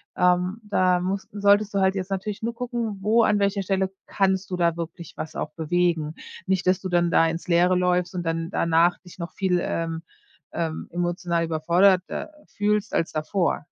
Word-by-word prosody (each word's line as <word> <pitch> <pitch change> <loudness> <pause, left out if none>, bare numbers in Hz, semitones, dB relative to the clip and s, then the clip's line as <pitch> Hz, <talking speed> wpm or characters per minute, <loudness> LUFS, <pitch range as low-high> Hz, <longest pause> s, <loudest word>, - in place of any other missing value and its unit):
Ähm, 180 +3 +2
da 185 -3 +2
muss 190 +2 -3
solltest 205 0 +3
du 200 - +1
halt 190 0 +2
jetzt 190 0 -4
natürlich 200 +2 -3
nur 235 +1 -1
gucken, 235 -3 -3
wo 225 +4 +4
an 210 - +3
welcher 200 0 +1
Stelle 190 0 0
kannst 190 -1 0
du 180 - -1
da 170 -1 +1
wirklich 170 0 -7
was 155 0 -6
auch 150 - -3
bewegen. 165 -1 0 0.3
Nicht, 190 -1 0
dass 185 0 +3
du 190 - -4
dann 175 -1 +2
da 165 - +4
ins 165 +2 -4
Leere 180 +1 +4
läufst 180 0 +1
und 180 -1 -3
dann 165 +1 -2
danach 170 0 +3
dich 180 - -15
noch 170 -2 -6
viel, 185 -3 +1
ähm, 165 0 -3 0.5
ähm, 160 -2 -3
emotional 175 -1 -1
überforderter 180 - +2 0.2
fühlst 210 +1 -1
als 165 - 0
davor. 155 0 -1
180 Hz, 185 wpm, -24 LUFS, 170-195 Hz, 0.5 s, wo